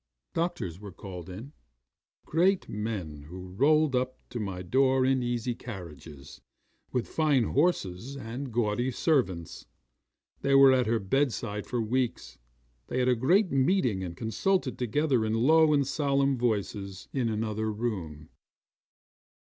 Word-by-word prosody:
'Doctors 165 - -2
were 100 -1 -9
called 90 -1 -9
in 115 +11 -9 0.7
great 180 +4 +2
men 100 -9 -4
who 90 +1 -8
rolled 145 +6 +3
up 130 +1 -1
to 125 - -5
my 95 -4 -4
door 130 +6 +3
in 130 0 +2
easy 120 0 -1
carriages, 80 - -10 0.5
with 125 - -1
fine 150 -6 +2
horses 135 - 0
and 125 +2 -6
gaudy 120 +2 0
servants. 120 - -1 0.7
They 140 0 +2
were 135 -1 +8
at 125 -2 +2
her 115 +1 +2
bedside 105 -2 -1
for 125 - -2
weeks. 120 +2 -2 0.5
They - - -3
had 125 0 +2
a 125 - +4
great 175 - +3
meeting 130 - +2
and 85 -2 -6
consulted 130 - 0
together 130 0 +1
in 110 0 0
low 155 +6 +5
and 140 -2 +3
solemn 140 -1 +1
voices 100 -5 -2
in 125 -4 0
another 110 0 -2
room. 90 -10 -4
120 Hz, 135 wpm, -28 LUFS, 100-135 Hz, 0.7 s, were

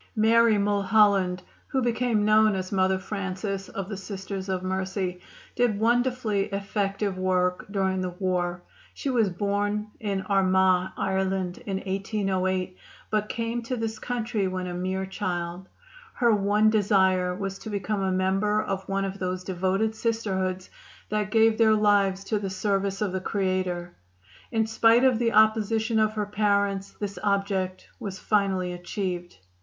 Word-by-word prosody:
Mary 225 0 +4
Mulholland, 200 -2 +3 0.2
who 270 - 0
became 235 -3 +1
known 215 -1 +5
as 185 -1 -4
Mother 190 -1 +2
Francis 195 0 -4
of 195 -1 -5
the 205 - -5
Sisters 195 0 -6
of 185 -1 -1
Mercy, 185 -1 -2 0.3
did 235 -4 +1
wonderfully 235 -3 +1
effective 200 -1 -2
work 180 -1 0
during 190 -2 0
the 185 - -2
war. 180 -1 -2 0.3
She 275 - -2
was 230 -5 +2
born 205 +3 -1
in 200 -3 -2
Armagh, 190 -1 +3
Ireland, 190 -1 -1
in 195 -1 -1
1808, 190 -2 -1 0.3
but 210 -1 0
came 230 +1 -2
to 250 +2 -4
this 225 -1 -3
country 230 -4 -2
when 185 0 -3
a 180 - -4
mere 185 +2 -2
child. 180 -1 -4 0.5
Her 235 -3 +3
one 210 +1 +3
desire 190 -4 +2
was 195 0 -4
to - - -8
become 205 0 -2
a 190 -1 0
member 195 +3 +1
of 195 -2 -3
one 195 0 0
of 195 +1 -5
those 185 0 -3
devoted 190 +4 0
Sisterhoods 190 -5 -2 0.4
that 210 -1 -1
give 225 0 +3
their 220 -1 +5
lives 200 -2 +2
to 210 +1 -1
the 195 -1 -3
service 195 +1 -1
of 200 - -1
the 190 0 -2
Creator. 185 -2 -1 0.6
In 225 -1 +2
spite 225 +2 +4
of 255 -4 +4
the 235 -1 +2
opposition 220 +1 +3
of 215 0 +2
her 210 -1 -1
parents 200 -1 0
this 205 -1 -4
object 195 -2 -1
was 195 -2 -5
finally 190 -3 0
achieved. 175 - -4
195 Hz, 150 wpm, -26 LUFS, 185-215 Hz, 0.6 s, known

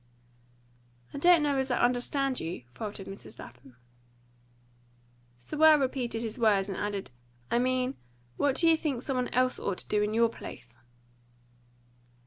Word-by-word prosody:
"I - - -5
don't 345 0 +5
know 285 -2 +1
as 265 0 -1
I 245 - +1
understand 250 +2 0
you," 165 -5 -5
faltered 205 -3 -6
Mrs. 195 +1 -11
Lapham. 125 +1 -13 1.6
Sewell 305 - +4
repeated 255 -4 -2
his 225 +2 -5
words, 205 -4 +3
and 195 - -4
added, 200 -6 -4 0.4
"I 235 - +3
mean, 255 +1 0 0.4
what 280 - +1
do 335 - +2
you 325 - +6
think 275 -6 -2
some 270 -2 -2
one 250 0 0
else 255 0 +1
ought 195 -2 -2
to - - -8
do 210 - +1
in 210 +1 -1
your 230 0 +4
place?" 120 - -10
245 Hz, 150 wpm, -29 LUFS, 205-270 Hz, 1.6 s, you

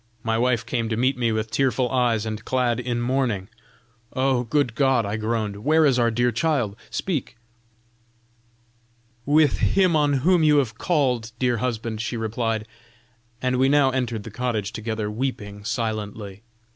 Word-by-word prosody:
My 115 -1 0
wife 120 0 +1
came 115 -3 -2
to 110 - -1
meet 130 +3 +2
me 120 -2 0
with 110 0 -2
tearful 130 0 +1
eyes 120 -4 +1
and 110 0 -4
clad 125 -2 0
in 120 -1 -2
mourning. 120 -6 -1 0.6
'Oh! 130 -1 +1
Good 135 0 +1
God!' 130 -2 +2
I 100 +1 -2
groaned, 110 -2 -2
'where 155 +8 +3
is 130 -3 +3
our 120 -1 +3
dear 120 +2 +1
child? 125 -5 0
speak!' 150 -9 -3 1.9
'With 150 +1 +4
him 185 -4 +3
on 145 -2 +3
whom 180 -1 +5
you 150 -1 +5
have 120 -5 0
called, 125 -9 0
dear 125 -1 +1
husband,' 115 -2 -3
she 115 +2 -3
replied; 110 0 -2 0.8
and 130 0 +1
we 135 +1 +4
now 140 -2 +4
entered 120 -5 -2
the 115 - -9
cottage 110 -3 -2
together 110 -1 -3
weeping 105 -4 -4
silently. 105 -3 -4
120 Hz, 160 wpm, -24 LUFS, 110-130 Hz, 1.9 s, whom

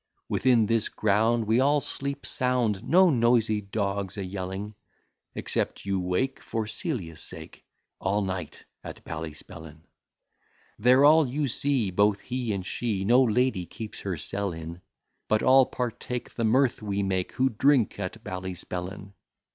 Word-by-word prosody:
Within 120 -4 +3
this 115 0 +1
ground 110 +2 +2
we 110 +3 +2
all 145 +3 +4
sleep 140 0 -4
sound, 120 -5 0
No 180 +5 +5
noisy 115 -4 +2
dogs 100 -1 -3
a 100 - -3
yelling; 95 +2 -5 0.6
Except - - -3
you 100 -1 0
wake, 90 +9 -1
for 115 -2 -3
Celia's 105 - -4
sake, 80 -3 -7 0.4
All 100 +2 0
night 95 -4 -5 0.2
at - - -9
Ballyspellin. 80 0 -8 1.0
There 125 +5 +5
all 155 0 +6
you 140 +3 -1
see, 130 -4 +1
both 100 +2 +3
he 125 -3 -3
and 95 -3 -3
she, 100 -3 -2
No 120 +5 +5
lady 120 -6 +1
keeps 110 -2 -8
her 95 -4 -3
cell 100 +6 -3
in; 80 +2 -8 0.5
But 110 - +2
all 130 0 +6
partake 125 0 -4
the 115 - -1
mirth 125 +3 +2
we 100 -1 -2
make, 95 -2 -1
Who 130 +1 +2
drink 130 -1 +2
at 105 +3 -5
Ballyspellin. 95 0 -6
105 Hz, 145 wpm, -27 LUFS, 95-125 Hz, 1.0 s, all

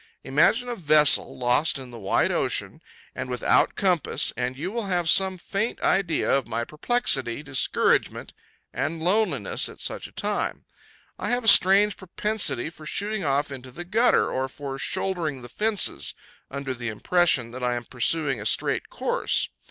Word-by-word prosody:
Imagine 170 - +2
a 240 - -3
vessel 150 -5 +4
lost 125 +5 +2
in 130 -2 -9
the 120 - -9
wide 100 - +1
ocean, - - -2 0.3
and - - -5
without 125 -1 +2
a - - -26
compass, 180 -6 +2
and 125 +1 -3
you 180 +7 -4
will 230 -2 -3
have 175 -3 0
some 190 +2 +3
faint 200 +5 -3
idea 190 -4 +1
of 135 -3 -1
my 115 +1 -2
perplexity, 150 - -1
discouragement, 135 -3 0 0.4
and 160 0 -3
loneliness 210 +5 0
at - - -13
such - - -4
a - - -18
time. - - -2 0.5
I - - -3
have 245 0 0
a - - -4
strange 200 +1 +6
propensity 190 - -1
for 155 -2 -12
shooting 210 +2 -2
off 145 0 0
into 130 -1 -8
the 170 +8 -8
gutter, 225 +7 +2
or 130 0 -2
for 135 0 -7
shouldering 160 -7 -3
the 120 - -8
fences, 195 - 0 0.3
under 140 -1 -4
the 120 -2 -5
impression 125 0 +1
that 130 +1 -8
I 125 0 +1
am 120 -1 -5
pursuing 135 0 0
a - - -6
straight - - -1
course. - - -1
150 Hz, 165 wpm, -25 LUFS, 130-190 Hz, 0.5 s, strange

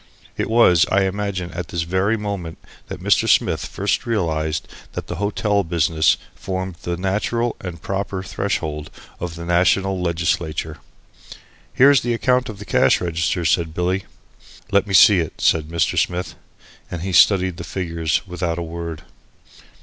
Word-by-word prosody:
It - - -2
was, 100 -7 +5
I 100 0 +3
imagine, 95 -2 -2
at 85 -2 -5
this 85 0 -2
very 95 +6 +1
moment 100 -6 -5 0.3
that - - -8
Mr. - - +3
Smith - - +2
first - - -2
realised 80 -8 -1 0.3
that - - -5
the - - -6
hotel 105 0 0
business 80 -2 +2 0.2
formed 95 -2 -5
the 85 0 -3
natural 105 +6 -1
and 90 -3 -6
proper 95 -1 -3
threshold 80 -7 -3 0.3
of 85 -1 -5
the 85 0 -7
national 90 +2 +2
legislature. 85 -2 -1 0.9
"Here's 140 0 +5
the 120 0 -1
account 125 +1 +1
of 105 - -7
the 105 - -9
cash - - +3
registers," 85 0 0
said 80 -3 0
Billy. 90 +2 -1 0.7
"Let 100 +1 +3
me 95 - 0
see 95 +2 +7
it," 80 -3 -2
said 80 -2 +2
Mr. 80 -1 0
Smith. 90 +1 -5 0.6
And 90 -1 -5
he 95 0 -3
studied 90 0 +4
the 90 - -6
figures 85 -4 -2
without 90 -2 -3
a 85 - -3
word. 85 -1 -6
90 Hz, 155 wpm, -21 LUFS, 85-100 Hz, 0.9 s, see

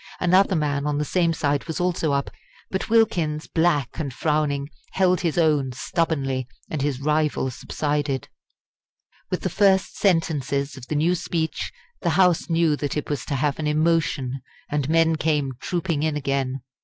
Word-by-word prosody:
Another 185 +2 +4
man 145 -2 0
on 145 -1 0
the 150 - 0
same 170 +1 +2
side 145 -3 0
was 160 - -4
also 175 -4 0
up, 140 0 -1 0.4
but 190 - -2
Wilkins, 170 -9 +2
black 160 -6 +1
and 145 -4 -2
frowning, 145 0 0 0.3
held 185 -1 +3
his 170 -2 -1
own 150 -6 +2
stubbornly, 135 -3 -1 0.2
and 155 - -2
his 140 -2 -1
rival 150 -2 +1
subsided. 145 0 -2 1.0
With - - -2
the - - -1
first 195 -2 +3
sentences 145 -7 +1
of 130 -2 -10
the 155 - -2
new 160 +4 +3
speech 165 -2 -2 0.3
the 175 - +1
House 180 -2 +3
knew 165 -2 +3
that 145 0 -2
it 150 - -3
was 145 - -2
to 140 - -2
have 140 +2 0
an 155 - -1
emotion, 150 -4 +1 0.3
and 145 -1 0
men 165 0 +3
came 150 -4 0
trooping 170 -4 -1
in 155 -1 0
again. 135 -2 -1
150 Hz, 165 wpm, -24 LUFS, 140-170 Hz, 1.0 s, Another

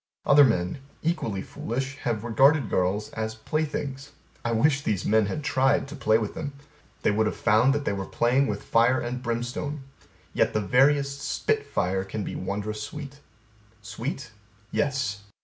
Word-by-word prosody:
Other 145 +1 +7
men, 90 -3 +1 0.2
equally 115 - -1
foolish, 135 +4 -4
have 115 -6 -2
regarded 135 +2 +4
girls 95 +4 0
as 110 0 -3
playthings. 145 +1 -3 0.3
I 120 - -1
wish 135 +5 +3
these 105 -7 -1
men 110 -1 +3
had 150 +8 -4
tried 135 0 +2
to 150 - -7
play 110 -6 +3
with 110 -2 -3
them. 145 -2 -5 0.5
They - - +4
would 110 +1 +2
have - - -2
found 110 +4 +4
that 145 -1 -2
they - - 0
were 95 -1 -4
playing 130 +4 +2
with - - -3
fire 120 +3 +3
and 125 +1 -4
brimstone. 125 +5 -3 0.5
Yet - - +1
the - - +3
veriest 140 +5 +3
spit 145 - -1
fire 95 +1 0
can 100 +2 -4
be - - -5
wondrous 105 +3 -3
sweet. 140 +4 -7 0.6
Sweet? 125 +4 -5 0.4
Yes. 130 -9 -1
120 Hz, 165 wpm, -26 LUFS, 105-140 Hz, 0.6 s, Other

